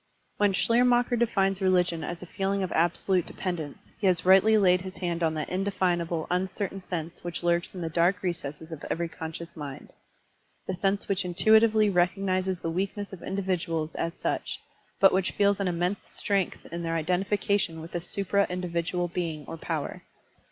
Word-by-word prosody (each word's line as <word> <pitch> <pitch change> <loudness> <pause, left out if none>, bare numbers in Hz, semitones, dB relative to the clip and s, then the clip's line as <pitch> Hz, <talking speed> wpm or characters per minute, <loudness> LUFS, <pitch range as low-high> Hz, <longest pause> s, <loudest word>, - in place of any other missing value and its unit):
When 205 -1 +3
Schleier 230 +5 +3
macher 245 0 +3
defines 195 -4 +2
religion 180 -3 +2
as 175 0 -5
a - - -7
feeling 195 +2 -1
of 185 - -3
absolute 175 +2 +1
dependence, 165 -6 -5
he 200 - +2
has 180 -2 +2
rightly 195 +4 +6
laid 180 -3 +4
his 185 0 -8
hand 175 -2 -2
on 160 -1 +1
that 155 - -2
indefinable, 180 -4 0
uncertain 190 +2 -1
sense 170 -3 -5
which 175 0 -4
lurks 175 +2 +1
in 180 - -5
the 165 - -2
dark 175 +3 +2
recesses 160 -3 -4
of 160 -3 -7
every 170 +1 -1
conscious 165 +1 -7
mind, 145 -4 -8 0.4
— - - -42
^the 185 - -1
sense 195 +2 0
which 195 0 0
intuitively 215 +4 +4
recognizes 185 0 +1
the 165 -1 -3
weakness 200 +3 -3
of 180 - -8
individuals 170 -5 -2
as 165 0 -3
such, - - -2 0.4
but 195 - +7
which 190 0 +1
feels 200 0 +3
an 195 - 0
immense 180 +3 0
strength 200 -3 -1
in 170 0 -4
their 165 0 -1
identification 185 +1 0
with 160 +1 -9
a 175 - -2
supra 200 +2 0
individual 175 0 -1
being 165 -4 -3
or - - -5
power. 160 -2 -4
180 Hz, 175 wpm, -28 LUFS, 170-195 Hz, 0.4 s, but